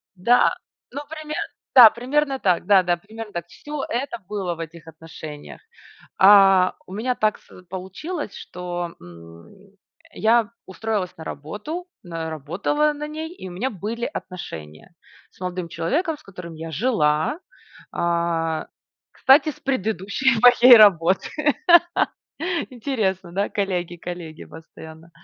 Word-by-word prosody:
Да, 235 +7 +4 0.4
ну 280 +3 -5
пример 310 -1 -6 0.4
да, 240 -4 +11
примерно 270 +4 -1
так. 180 -4 0
Да-да, 185 -3 +4
примерно 215 +4 -10
так. 170 -1 -5
Всё 295 +8 -7
это 240 0 -3
было 195 -4 -2
в 165 - -12
этих 165 0 -9
отношениях. 160 -2 -10 0.6
А, 195 -2 +7
у 185 - -10
меня 245 +5 -1
так 215 -3 +1
с 180 - -17
получилось, 190 - -6
что, 175 -1 -6
м, 85 -1 -14 0.6
я 225 0 +2
устроилась 195 -1 -3
на 160 - -8
работу, 210 - -6 0.2
на 165 -2 -5
работала 195 - -1
на 300 +1 -5
ней, 315 +3 -6
и 190 - -9
у - - -9
меня 205 +9 -2
были 225 +2 -4
отношения 80 - -8 0.4
с - - -26
молодым 180 -1 -4
человеком, 300 - -1
с 300 - -21
которым 180 -3 -10
я 160 +1 -7
жила, 160 - +1 0.5
а, 170 -2 -1 0.5
кстати, 280 +3 +5
с 290 - -13
предыдущей 220 0 0
моей 245 0 +9
работы. 190 -4 +5 1.4
Интересно, 215 -8 -2
да? 200 +3 -1
Коллеги, 180 -4 -2
коллеги 170 -2 -8
постоянно. 160 0 -13
190 Hz, 130 wpm, -22 LUFS, 170-245 Hz, 1.4 s, да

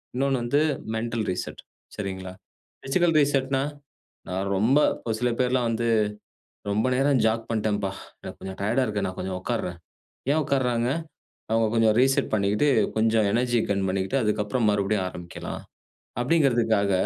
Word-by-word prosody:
இன்னொன்னு 135 0 +1
வந்து 140 +5 +2 0.3
mental 115 0 -2
reset. 90 - -5 0.4
சரிங்களா, 95 -2 -5 0.5
பிசிக்கல் 165 +4 +2
ரீசெட்ன்னா, 135 -2 +2 0.7
நான் 95 +2 -2
ரொம்ப 120 +9 +4 0.3
ஒரு 110 - 0
சில 125 0 +1
பேர்லாம் 125 -1 +2
வந்து 115 +1 -1 0.8
ரொம்ப 110 +4 +1
நேரம் 135 0 +3
ஜாக் 110 +1 0
பண்ணிட்டேன். 110 -2 0 0.4
எனக்கு - - -8
கொஞ்சம் 95 0 -7
டயர்ட்டா 120 +6 +1
இருக்கு, 105 -2 -1
நான் 95 - -6
கொஞ்சம் 95 0 -3
உட்கார்றேன். 95 -7 -3 0.5
ஏன் 155 - +3
உட்கார்றாங்க, 125 -3 +1 0.6
அவங்க 115 0 +3
கொஞ்சம் 110 -2 +4
ரீசெட் 135 +1 +2
பண்ணிட்டு 105 +6 +2 0.3
கொஞ்சம் 110 -1 +3
எனர்ஜி 120 +2 +2
கெயின் 100 -1 0
பண்ணிட்டு 95 +5 -1
அதுக்கு 105 -2 +1
அப்புறம் 110 +3 -1
மறுபடியும் 100 -1 +1
ஆரம்பிக்கலாம். 85 -1 -7 0.6
அப்படிங்ன்கிறதுக்காக 120 -8 +2
115 Hz, 135 wpm, -25 LUFS, 100-130 Hz, 0.8 s, ரொம்ப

